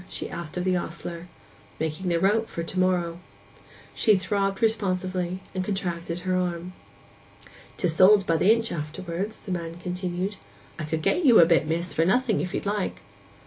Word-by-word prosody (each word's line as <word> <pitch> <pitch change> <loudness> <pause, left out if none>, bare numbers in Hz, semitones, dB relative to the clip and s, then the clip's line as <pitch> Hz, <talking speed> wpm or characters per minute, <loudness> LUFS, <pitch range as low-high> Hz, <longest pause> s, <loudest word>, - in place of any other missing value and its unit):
she - - -5
asked 170 -1 -6
of 180 - -1
the 185 0 +2
ostler. 170 0 -5 0.5
'Making 160 +4 -2
the 170 -1 +2
rope 215 +5 +2
for 170 - -4
to 185 +3 -3
morrow.' 175 -2 +1 0.7
She 215 -3 +4
throbbed 195 0 -1
responsively, 185 -4 0
and 185 -1 -1
contracted 175 -3 -3
her 185 0 0
arm. 180 0 -2 1.0
''Tis 165 -3 0
sold 195 +1 +7
by 165 -2 +2
the 195 - +5
inch 230 0 +1
afterwards,' 170 +6 -4
the 195 - -8
man 170 -2 -3
continued. 180 +2 -3 0.4
'I 155 - -3
could 160 +1 -2
get 355 - +2
you 245 -6 +7
a 170 - +9
bit, 165 -2 +3
miss, 165 0 -2
for 165 - +2
nothing, 220 +4 +2
if 180 - -3
you'd - - -3
like? 205 -1 -2
180 Hz, 175 wpm, -26 LUFS, 170-195 Hz, 1.0 s, a